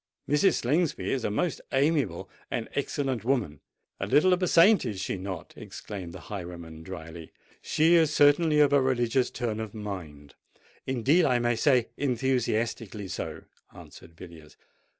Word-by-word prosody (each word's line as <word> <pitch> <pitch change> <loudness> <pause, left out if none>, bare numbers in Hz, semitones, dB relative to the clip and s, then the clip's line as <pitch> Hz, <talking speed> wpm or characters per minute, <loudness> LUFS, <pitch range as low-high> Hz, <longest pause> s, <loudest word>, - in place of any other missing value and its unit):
Mrs. 150 +6 +3
Slingsby 155 +6 0
is 130 -3 -1
a - - 0
most 160 +11 -1
amiable 135 - 0 0.2
and - - -3
excellent 130 -6 -2
woman——" 115 - -1 0.4
"A - - -3
little 150 +8 +4
of 180 - 0
a 180 - +1
saint—is 165 - +4
she 95 - -3
not?" 95 0 -7
exclaimed 95 -5 -8
the - - -10
highwayman 85 -5 -8
drily. 80 -2 -9 0.3
"She 160 +3 +2
is 160 -3 +4
certainly 150 +1 +4
of 145 -1 +4
a 140 - +5
religious 125 -1 +1
turn 110 -3 -3
of 110 -1 -6
mind—indeed, 105 - -3
I 125 -4 +3
may 120 0 +1
say, 125 -1 +2
enthusiastically 115 -6 -1
so," - - -5 0.3
answered 80 - -14
Villiers. 80 -4 -13
120 Hz, 145 wpm, -27 LUFS, 95-145 Hz, 0.4 s, a